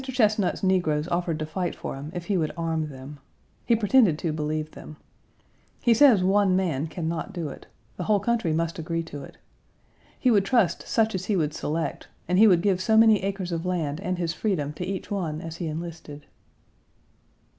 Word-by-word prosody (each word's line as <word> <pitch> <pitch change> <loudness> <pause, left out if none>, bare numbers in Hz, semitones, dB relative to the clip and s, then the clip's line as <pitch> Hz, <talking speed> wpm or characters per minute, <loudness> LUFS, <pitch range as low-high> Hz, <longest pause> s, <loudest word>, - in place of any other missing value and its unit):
Chesnut's 215 -8 +1
negroes 175 -5 +1
offered 175 -2 -1
to 155 - -3
fight 175 +3 -3
for - - -6
him 140 +2 -7
if 175 -1 -5
he 200 - 0
would 160 -4 0
arm 165 -2 -1
them. 140 +1 -10 0.5
He 235 - +5
pretended 215 - +4
to 160 -1 -2
believe 155 0 -3
them. 155 - -11 0.9
He 240 - +5
says 230 -6 +6
one 195 0 +3
man 165 -6 0
can 160 +1 -4
not 165 0 -3
do 165 -4 -4
it. - - -11 0.3
The - - -4
whole 210 -2 +3
country 225 -4 0
must 165 +1 -1
agree 165 +1 -2
to 145 -3 -8
it. - - -13 0.8
He 255 - +3
would 205 -3 +4
trust 195 -5 +1
such 225 -1 +1
as 185 -1 -3
he 210 - 0
would 155 -4 0
select, 160 +2 -3 0.2
and 180 +2 +2
he 220 - +8
would 180 -4 +4
give 190 -3 +2
so 220 +3 +3
many 220 -2 +6
acres 190 -2 -3
of 165 -1 -2
land 165 -5 -2
and 185 -1 -2
his 170 -2 -1
freedom 155 -7 -1
to 180 - -5
each 195 +1 -5
one 165 -6 -2
as 165 0 -7
he 170 - -4
enlisted. 155 -2 -7
175 Hz, 200 wpm, -25 LUFS, 155-200 Hz, 0.9 s, he